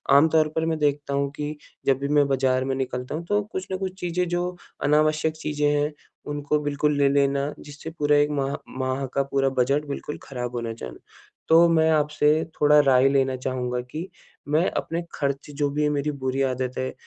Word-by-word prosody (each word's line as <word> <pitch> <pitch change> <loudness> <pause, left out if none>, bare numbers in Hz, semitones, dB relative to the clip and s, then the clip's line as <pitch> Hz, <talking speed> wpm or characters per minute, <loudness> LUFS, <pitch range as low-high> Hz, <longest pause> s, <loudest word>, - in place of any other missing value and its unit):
आम 150 +3 +7
तौर 155 -1 +3
पर 160 0 +1
मैं 160 -1 0
देखता 145 -1 0
हूँ 140 0 0
कि 150 +1 -4 0.3
जब 135 -1 +3
भी 140 - -2
मैं 145 -1 +3
बाज़ार 130 -1 +1
में 135 0 -1
निकलता 125 +1 -3
हूँ, 170 +1 -5
तो 205 +2 +1
कुछ 185 0 -4
न 185 - -1
कुछ 190 0 -5
चीज़ें 180 0 -1
जो 175 +1 -2 0.3
अनावश्यक 155 +1 +2
चीज़ें 150 -1 -1
हैं, 145 +1 +1 0.4
उनको 145 +1 0
बिल्कुल 145 0 0
ले 140 -1 +4
लेना, 140 +1 +1
जिससे 145 +2 -9
पूरा 145 0 +3
1 145 0 +3
माह 140 -1 -1 0.2
माह, 130 +1 -1
का 140 +2 -1
पूरा 135 0 +1
बजट 140 +4 +2
बिल्कुल 145 +1 -5
खराब 125 -2 -5
होना 115 -1 -3
जाना। 60 - -8 0.5
तो 165 +1 +7
मैं 160 -1 +4
आपसे 150 -1 +2 0.3
थोड़ा 150 0 +6
राय 135 -2 +5
लेना 135 -1 +2
चाहूँगा 125 -1 -2
कि 165 +4 -5 0.4
मैं 155 +5 +2
अपने 165 +1 -2
खर्च 140 0 -2
जो 145 -1 +1
भी 150 +1 -1
है 150 - +3
मेरी 150 +1 -1
बुरी 130 +1 0
आदत 130 0 -3
है, 130 0 -2
145 Hz, 200 wpm, -24 LUFS, 135-155 Hz, 0.5 s, आम